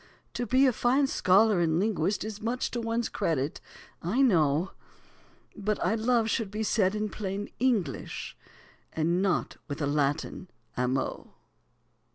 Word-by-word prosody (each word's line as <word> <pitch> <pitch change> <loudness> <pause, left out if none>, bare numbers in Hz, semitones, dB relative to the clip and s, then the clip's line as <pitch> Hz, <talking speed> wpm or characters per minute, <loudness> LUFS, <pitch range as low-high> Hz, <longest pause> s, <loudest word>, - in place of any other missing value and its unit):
To 245 0 -3
be 260 +4 +4
a 255 - +4
fine 255 +5 +2
scholar 205 -4 +4
and 165 -2 +2
linguist 200 -2 0
Is 215 -1 -6
much 235 +3 -2
to 240 - -2
one's 230 0 -1
credit, 145 -2 -2 0.4
I 220 +11 +1
know, 165 - +3 0.8
But 210 0 -1
"I - - +2
love" 225 0 +2
should 225 -2 -1
be 215 +2 -3
said 205 -2 +2
in 215 0 -1
plain 205 -1 -4
English, 220 - -1 0.6
And 170 +3 +1
not 195 -2 0
with 145 -1 -5
a 145 - 0
Latin 145 +5 -1 0.3
"amo." 125 +1 -2
205 Hz, 145 wpm, -28 LUFS, 165-230 Hz, 0.8 s, be